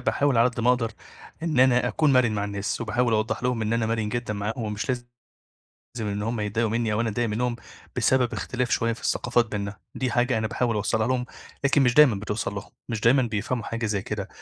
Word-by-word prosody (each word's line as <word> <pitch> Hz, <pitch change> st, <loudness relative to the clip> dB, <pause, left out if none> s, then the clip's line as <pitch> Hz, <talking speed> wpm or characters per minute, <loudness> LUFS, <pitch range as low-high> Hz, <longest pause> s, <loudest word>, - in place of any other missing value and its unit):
باحاول 140 Hz, -4 st, +1 dB
على 115 Hz, +2 st, +5 dB
قد 125 Hz, -1 st, -5 dB
ما 120 Hz, -, +2 dB
أقدر 120 Hz, -3 st, 0 dB, 0.5 s
إن 155 Hz, -6 st, +1 dB
أنا 125 Hz, -1 st, +4 dB
أكون 150 Hz, -3 st, +2 dB
مَرِن 125 Hz, -3 st, +4 dB
مع 100 Hz, -1 st, -1 dB
الناس 100 Hz, +2 st, -3 dB
وباحاول 120 Hz, +1 st, +1 dB
أوضّح 110 Hz, +1 st, 0 dB
لهم 125 Hz, -2 st, 0 dB
إن 110 Hz, -, -1 dB
أنا 115 Hz, -1 st, +1 dB
مَرِن 110 Hz, -1 st, -1 dB
جدًا 120 Hz, 0 st, -2 dB
معاهم 105 Hz, +3 st, -3 dB
ومش 105 Hz, +2 st, -3 dB
لازم 125 Hz, -2 st, -1 dB, 1.0 s
إن 105 Hz, -2 st, -2 dB
هم 115 Hz, +1 st, -2 dB
يضايقوا 105 Hz, +2 st, 0 dB
منّي 115 Hz, -1 st, 0 dB
أو 105 Hz, -, +1 dB
أنا 115 Hz, -, 0 dB
أضايق 115 Hz, +2 st, -1 dB
منّهم 120 Hz, +3 st, -1 dB, 0.4 s
بسبب 130 Hz, -3 st, +2 dB
اختلاف 125 Hz, -1 st, -2 dB
شوية 115 Hz, 0 st, +1 dB
في 115 Hz, -, -12 dB
الثقافات 120 Hz, -1 st, +1 dB
بيننا، 100 Hz, -1 st, -4 dB, 0.2 s
دي 130 Hz, -2 st, -1 dB
حاجة 120 Hz, -1 st, +2 dB
أنا 110 Hz, -, 0 dB
باحاول 120 Hz, 0 st, 0 dB
أوصّلها 110 Hz, +1 st, 0 dB
لهم، 125 Hz, -1 st, 0 dB, 0.4 s
لكن 140 Hz, 0 st, +4 dB
مش 125 Hz, -2 st, +3 dB
دايمًا 150 Hz, -6 st, +7 dB
بتوصل 105 Hz, +2 st, -3 dB
لهم، 100 Hz, -, -6 dB, 0.2 s
مش 110 Hz, -2 st, -3 dB
دايمًا 125 Hz, +4 st, +5 dB
بيفهموا 115 Hz, +1 st, -2 dB
حاجة 115 Hz, +1 st, -3 dB
زي 105 Hz, -2 st, -1 dB
كده. -, -, -4 dB
115 Hz, 215 wpm, -25 LUFS, 110-125 Hz, 1.0 s, دايمًا